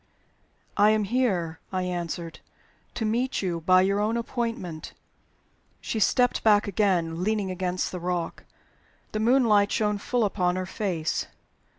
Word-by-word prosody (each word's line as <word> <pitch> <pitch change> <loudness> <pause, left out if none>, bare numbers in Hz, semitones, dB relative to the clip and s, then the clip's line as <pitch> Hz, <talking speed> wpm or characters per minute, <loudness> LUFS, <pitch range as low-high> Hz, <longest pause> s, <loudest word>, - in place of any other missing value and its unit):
"I 205 +1 +6
am 215 0 +2
here," 190 -8 0
I 185 -1 -1
answered, 175 -2 -4 0.6
"to 225 - -2
meet 240 +2 0
you, 170 -3 -2
by 185 +2 +5
your 200 +1 +1
own 215 +3 0
appointment." 230 -9 -4 0.9
She 220 - -3
stepped 245 +3 +2
back 210 -2 +4
again, 180 -4 0
leaning 205 -2 0
against 185 0 -2
the 180 - -5
rock. 175 -1 -3 0.7
The 215 - -2
moonlight 220 -4 +4
shone 210 -1 0
full 240 +2 0
upon 180 -3 0
her 185 0 -2
face. 180 -5 -2
200 Hz, 135 wpm, -26 LUFS, 180-220 Hz, 0.9 s, I